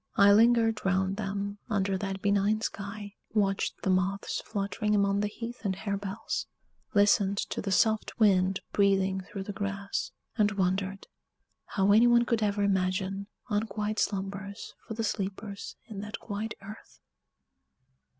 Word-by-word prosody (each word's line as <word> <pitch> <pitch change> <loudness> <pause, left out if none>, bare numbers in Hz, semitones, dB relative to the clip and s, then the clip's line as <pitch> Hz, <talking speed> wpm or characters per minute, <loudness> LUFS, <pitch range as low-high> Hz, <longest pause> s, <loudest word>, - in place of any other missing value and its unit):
I 200 0 +7
lingered 225 0 +4
round 190 0 +1
them, 200 0 -3
under 195 -2 +1
that 195 0 -4
benign 205 +1 +2
sky; 205 -1 -5 0.2
watched 195 -2 0
the 190 - +2
moths 185 +2 0
fluttering 210 0 -1
among 200 0 +2
the 210 - +1
heath 235 +3 -7
and 195 -3 0
harebells; 200 0 -3 0.5
listened 200 -1 +4
to - - -2
the 195 - -3
soft 220 +4 +2
wind 190 -3 +4
breathing 195 -1 +2
through 195 +1 -7
the 205 - -6
grass; 200 -1 -3 0.3
and 210 -2 +3
wondered 195 0 -1 0.6
how 195 0 +2
any 225 +4 +7
one 240 0 +5
could 230 -2 +1
ever 205 -1 +1
imagine 195 0 0 0.2
unquiet 210 0 -1
slumbers 200 +1 -3
for 220 - -5
the 225 - -2
sleepers 200 -1 -4
in 215 -3 -8
that 210 +1 -5
quiet 215 +1 -4
earth. 205 +2 -11
200 Hz, 140 wpm, -29 LUFS, 195-210 Hz, 0.6 s, I